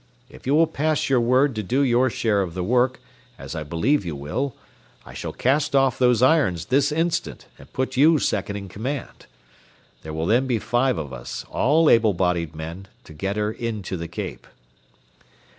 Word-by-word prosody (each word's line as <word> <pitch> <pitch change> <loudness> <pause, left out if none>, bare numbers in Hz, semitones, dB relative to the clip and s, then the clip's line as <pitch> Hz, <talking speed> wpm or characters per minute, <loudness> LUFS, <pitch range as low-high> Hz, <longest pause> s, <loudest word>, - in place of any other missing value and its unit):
If - - -13
you 140 - +3
will 165 +2 +5
pass 155 -1 -1
your 130 - +4
word 130 +4 +3
to 110 - -3
do 125 +8 0
your 130 0 +3
share 110 -3 +1
of 90 -3 -4
the 90 - -2
work, 125 +5 +1 0.4
as - - -8
I 80 - -4
believe 85 - 0
you 85 -4 -4
will, 95 - -3 0.5
I - - -12
shall - - -5
cast 140 +3 +1
off 135 -2 +3
those 125 -2 +3
irons 130 - +3
this 140 +3 +2
instant 165 +2 -2
and - - -15
put 130 0 -2
you 155 +4 +6
second 100 -6 -1
in 100 -1 -6
command. 125 +9 -6 0.7
There 80 - -8
will 80 +1 -3
then 120 +8 +2
be 120 -3 +1
five 120 +3 0
of 70 -4 -5
us, - - -7
all 155 +5 +3
able 110 -6 +4
bodied 85 -3 -1
men, 85 +5 -7 0.2
to - - -13
get 95 +6 -3
her 105 0 0
in 110 -2 -4
to 95 - -4
the 85 -1 -5
Cape." 85 - -7
115 Hz, 195 wpm, -23 LUFS, 90-135 Hz, 0.7 s, you